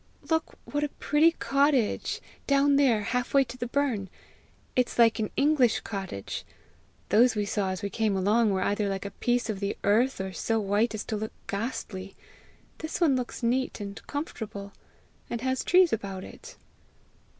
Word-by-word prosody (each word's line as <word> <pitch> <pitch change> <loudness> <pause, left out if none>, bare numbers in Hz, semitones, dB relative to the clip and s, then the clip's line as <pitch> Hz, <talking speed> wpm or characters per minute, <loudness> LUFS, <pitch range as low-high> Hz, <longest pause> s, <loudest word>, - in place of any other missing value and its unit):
"Look 320 0 0
what 290 0 -2
a 295 - 0
pretty 305 +4 +3
cottage! 275 -6 +1 0.3
down 280 0 +4
there, 245 -7 +3
half 250 +5 -1
way 275 - +7
to 255 - -9
the 245 -1 -4
burn! 240 -8 0 0.7
It's 250 -1 +1
like 230 -1 +5
an 215 - -1
English 275 -5 +3
cottage! 190 - -5 0.7
Those 230 +4 +5
we 210 -1 0
saw 200 -1 -1
as 185 +2 -4
we 200 - -2
came 215 -3 +1
along 210 +4 +3
were 190 -1 +1
either 205 0 0
like 195 0 -3
a 200 - -4
piece 240 +1 0
of 215 -3 -3
the 200 0 -2
earth, 230 +6 +3
or 190 0 -4
so 225 +6 0
white 210 +2 +1
as 215 - -4
to 215 - -3
look 220 +1 -5
ghastly! 200 -3 -4 0.6
This 315 0 -4
one 315 -7 +4
looks 250 0 -4
neat 255 +2 0
and 200 -1 -6
comfortable, 220 -9 -5 0.6
and 235 - -3
has 260 0 0
trees 360 -2 +5
about 195 -3 -3
it!" - - -12
225 Hz, 170 wpm, -28 LUFS, 200-265 Hz, 0.7 s, way